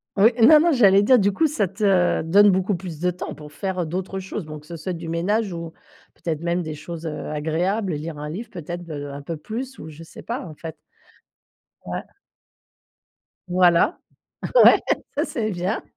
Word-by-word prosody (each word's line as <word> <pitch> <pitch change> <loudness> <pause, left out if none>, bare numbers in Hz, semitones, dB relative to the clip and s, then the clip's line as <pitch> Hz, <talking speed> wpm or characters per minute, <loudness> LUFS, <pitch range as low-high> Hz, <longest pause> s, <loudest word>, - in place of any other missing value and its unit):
Oui. 210 +4 +6
Non, 300 +7 +9
non, 335 +2 +3
j'allais 200 -7 +5
dire 250 +4 +6
du 200 0 +3
coup, 210 +12 +1
ça 235 -10 0
te 190 -2 +2
donne 200 +6 +6
beaucoup 190 +1 +1
plus 175 -4 -7
de 180 +2 +1
temps 180 - -6
pour 150 0 -12
faire, 190 +4 -4
heu, - - -1
d'autres 185 +4 -4
choses, 190 0 -6
donc 150 -1 -8
que 150 - -20
ce 170 - -7
soit 175 +3 -4
du 165 -1 -6
ménage 195 +5 0
ou 165 -1 -6 0.4
peut - - -31
être 155 -1 -3
même 170 +1 -1
des 155 -1 -5
choses, 165 +2 -8
heu, 155 -2 -5
agréables, 170 +6 -1
lire 155 +1 -5
un 150 +1 -5
livre, 215 +9 -6
peut 175 -6 -8
être, 175 0 -6
heu, 145 -2 -5
un 140 +1 -7
peu 160 +3 -5
plus 250 - -6
ou 160 - -9
je 155 +1 -12
sais 165 - -12
pas, 240 +3 -4
en 155 - -10
fait. 160 +1 -8 1.1
Ouais. - - -5 1.4
Voilà, 180 - +3 0.7
ouais, - - +8 0.4
ça - - +1
c'est 220 -3 -2
bien. 185 +4 -2
175 Hz, 205 wpm, -23 LUFS, 160-200 Hz, 1.4 s, Non